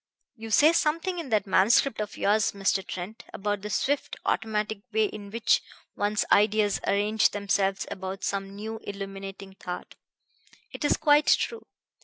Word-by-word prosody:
"You 225 -1 -8
say 295 +9 +5
something 335 +3 0
in 315 -6 -6
that 215 -4 +2
manuscript 215 +5 +3
of 210 - -5
yours, 210 +1 +2
Mr. 195 -1 0
Trent, 185 +4 -7
about 205 0 -2
the 210 - -5
swift, 280 +8 -1
automatic 215 -1 -1
way 220 0 +3
in 205 -1 -7
which 230 +2 +2 0.3
one's 205 0 0
ideas 210 0 +3
arrange 210 +2 +3
themselves 200 -1 0
about 190 -1 -6
some 195 0 -3
new, 220 +2 -6
illuminating 195 -1 -7
thought. 180 -2 -7 0.8
It - - -7
is 290 - +3
quite 295 -1 +4
true. 465 - +1
210 Hz, 150 wpm, -27 LUFS, 195-220 Hz, 0.8 s, say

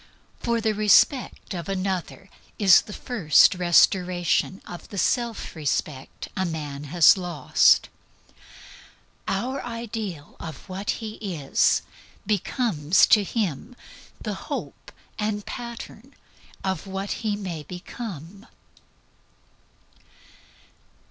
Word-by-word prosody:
The 230 -2 0
respect 215 +4 +3
of 175 0 -5
another 190 0 -3 0.3
is 195 -3 +7
the - - -12
first 200 - +4
restoration 180 +1 +2
of 175 - -9
the 200 - -8
self 235 +2 -1
respect 145 -2 -3
a 190 - 0
man 150 -4 -4
has 165 +4 +6
lost; 175 -7 +3 1.4
our 250 +8 -2
ideal 220 -9 -6
of 160 -2 -9
what 190 +2 -6 0.2
he 215 0 -7
is 170 -10 +1 0.4
becomes 195 - +2
to 210 -3 +6
him 205 - -3 0.4
the - - -4 0.2
hope - - -6 0.3
and 210 -1 -2
pattern 235 +2 -8 0.5
of 190 -1 -2
what 195 +1 -4
he 215 -3 0
may 185 -6 -5
become. 180 - -8
195 Hz, 95 wpm, -25 LUFS, 170-215 Hz, 1.4 s, is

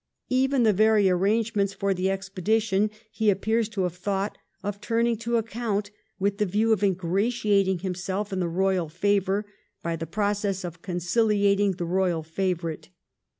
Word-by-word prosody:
Even 265 0 +3
the 215 -2 +4
very 210 -1 +4
arrangements 200 +1 +1
for 195 0 0
the 185 +1 0
expedition 195 +2 0 0.2
he 220 -2 +1
appears 220 +3 +1
to 205 -4 -2
have 180 -2 -1
thought 195 +2 -2 0.3
of 205 0 -4
turning 230 +1 +1
to 235 +1 0
account, 220 -2 -2 0.3
with 200 +1 -1
the 210 - +3
view 215 +4 +2
of 210 - -1
ingratiating 195 +1 +1
himself 190 +3 -3
in 190 - -1
the 175 - 0
royal 185 -1 +1
favour 200 +3 +1 0.4
by 170 0 -1
the 165 0 -5
process 200 +1 -1
of 170 -1 -7
conciHating 200 +2 +1
the 175 - -2
royal 175 -2 0
favourite. 170 -1 -3
200 Hz, 150 wpm, -26 LUFS, 185-215 Hz, 0.4 s, the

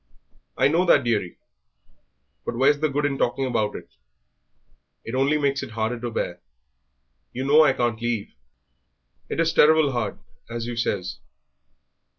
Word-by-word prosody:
"I - - +4
know 165 +5 +2
that, 155 -5 +5
dearie; 105 -7 -1 1.1
but 115 - -4
where's 135 +4 +3
the 155 0 +1
good 145 +1 -1
in 140 -1 -1
talking 135 +2 0
about 110 -5 -1
it? - - -11 1.1
It 115 - -6
only 135 +4 +2
makes 140 -2 0
it - - -6
harder 115 +2 -2
to 120 0 -4
bear. 115 - -3 0.9
You 130 +2 -3
know 150 +3 +6
I - - +4
can't 120 -2 -1
leave. 120 -3 -2 1.0
It - - -3
is 165 -1 +2
terrible 155 -2 +5
hard, 120 -2 -3 0.3
as 115 0 -4
you 120 0 -4
says." 95 -5 -2
125 Hz, 155 wpm, -24 LUFS, 115-145 Hz, 1.1 s, know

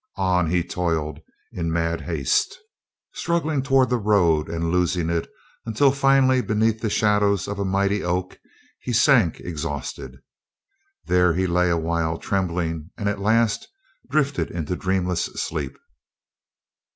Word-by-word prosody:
On 90 -3 +1
he 90 0 +1
toiled 80 -4 -2 0.3
in 85 -2 -3
mad 85 0 -1
haste, 415 -2 0 0.6
struggling 160 -4 -1
toward 135 -1 +2
the 125 - +2
road 90 -8 +2
and 85 0 -2
losing 90 -1 +1
it 85 -1 -2 0.3
until 115 +5 +3
finally 135 -1 +3
beneath 110 0 0
the 110 - -1
shadows 105 -2 +2
of 100 0 -4
a 100 - -1
mighty 100 +1 0
oak 90 +1 -2 0.4
he 125 - -4
sank 115 - +4
exhausted. 75 -5 -5 0.9
There 90 -2 +3
he 95 +1 +1
lay 90 0 +2
a 85 - +2
while 80 0 -1
trembling 85 -4 -2
and 100 - -2
at 100 0 -1
last 110 +1 +1 0.4
drifted 145 -2 0
into 85 +1 -3
dreamless 90 -2 -1
sleep. 70 -4 -4
95 Hz, 135 wpm, -23 LUFS, 85-110 Hz, 0.9 s, sank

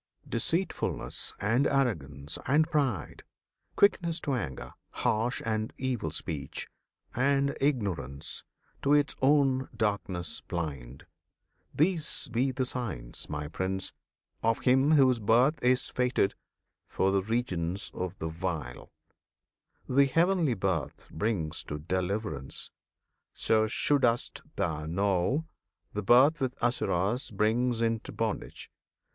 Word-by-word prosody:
Deceitfulness, 165 +11 -1
and 115 +7 +2
arrogance, 80 - -1
and 150 +4 +4
pride, 140 - -1 0.5
Quickness 170 -4 +3
to 140 - -1
anger, 65 - -4 0.2
harsh 115 +4 0
and 110 -1 -1
evil 125 -10 -1
speech, 75 -2 -3 0.5
And 140 +2 +2
ignorance, 95 - -1 0.4
to 145 +1 +4
its 145 -1 +2
own 135 -1 +3
darkness 100 -5 -1
blind, 70 -7 -5 0.7
These 160 0 +1
be 125 +4 +1
the 130 0 -1
signs, 100 - -4
My 75 0 -3
Prince! 95 +4 -2 0.5
of 115 0 +1
him 130 +4 +4
whose 130 -5 +5
birth 120 +8 +3
Is 125 +1 +3
fated 125 -6 +1 0.5
for 95 - +1
the 95 0 +2
regions 95 -5 -2
of 90 +1 -4
the 80 - -3
vile.[FN#32] 80 - -8
The 140 - +8
Heavenly 165 -2 +2
Birth 95 -5 -2
brings 80 -4 -1
to 75 - -4
deliverance, 90 - -2 0.6
So 110 -1 +3
should'st 120 +1 +1
thou 80 -6 -2
know! 100 - +1 0.5
The 105 - -2
birth 135 +9 +5
with 130 -1 -1
Asuras 120 0 0
Brings 115 +3 +1
into 115 -1 -1
bondage. - - -4
115 Hz, 110 wpm, -29 LUFS, 90-130 Hz, 0.7 s, The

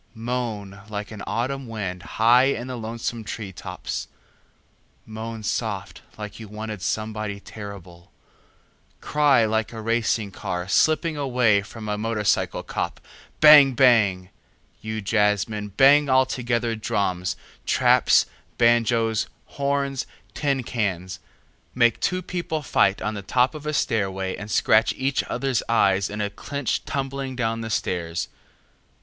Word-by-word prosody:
Moan 110 -4 -4
like 105 0 -5
an 105 -2 -8
autumn 130 +3 -2
wind 100 -5 -4 0.2
high 120 +3 +6
in 125 -3 -1
the 130 0 -5
lonesome 115 0 -4
tree 105 -2 -6
tops, - - -6 1.0
moan 110 0 -7
soft 105 -2 -3 0.2
like 105 0 -7
you 110 - -8
wanted 105 -1 -6
somebody 105 0 -3
terrible, 100 -5 -10 0.9
cry 145 -6 +3
like 110 0 0
a 115 - -7
racing 110 -2 0
car 90 -1 -4
slipping 155 - +2
away 125 -7 +2
from 110 +2 -9
a 105 0 -2
motorcycle 110 -2 0
cop, - - -4 0.4
bang 150 -3 +9
bang! 105 -8 +3 0.5
you 110 0 -4
jazzmen, 105 0 +1
bang 140 +1 +6
altogether 120 -3 +1
drums, 95 -4 -1 0.3
traps, - - +4 0.3
banjoes, 115 -1 +2 0.2
horns, 140 -1 -2 0.3
tin 140 -3 0
cans—make 105 +3 -2
two 185 0 -1
people 170 -4 -3
fight 100 -7 +2
on 105 +2 -1
the 100 - -5
top 125 - +2
of 150 -1 -8
a - - 0
stairway 95 -8 -1
and 105 0 -8
scratch 110 +1 +3
each 135 0 0
other's 135 -4 -1
eyes 100 -4 +3
in 105 +1 -4
a 100 -1 -2
clinch 140 +5 -3
tumbling 135 -1 -3
down 115 -2 -1
the 115 - -5
stairs. 85 -5 -2
110 Hz, 130 wpm, -24 LUFS, 105-130 Hz, 1.0 s, bang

